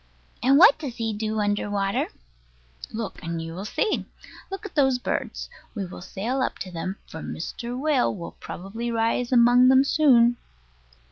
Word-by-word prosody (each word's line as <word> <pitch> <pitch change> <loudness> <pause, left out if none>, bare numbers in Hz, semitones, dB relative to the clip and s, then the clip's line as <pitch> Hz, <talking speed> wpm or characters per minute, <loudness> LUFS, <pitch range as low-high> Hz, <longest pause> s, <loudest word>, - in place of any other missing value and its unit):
And 265 +4 +5
what 405 +10 +7
does 270 -6 -5
he 225 -2 -2
do 215 +1 -2
under 205 0 0
water? 200 -1 0 0.8
Look 220 -1 -5
and 165 -2 -4
you 165 0 -6
will 190 +4 -6
see. 425 - -1 0.4
Look 390 +1 -6
at 405 - -7
those 265 -4 +3
birds. 250 - -3 0.3
We 200 -3 -3
will 180 - -9
sail 235 +9 -3
up - - -1
to 185 - -9
them; 185 +3 -4
for 160 - -9
Mr. 240 +9 -5
Whale 280 -6 +1
will 170 -3 -8
probably 225 +6 -6
rise 230 +2 0
among 245 +1 +6
them 265 +1 +6
soon. 245 -5 +4
235 Hz, 165 wpm, -25 LUFS, 200-260 Hz, 0.8 s, what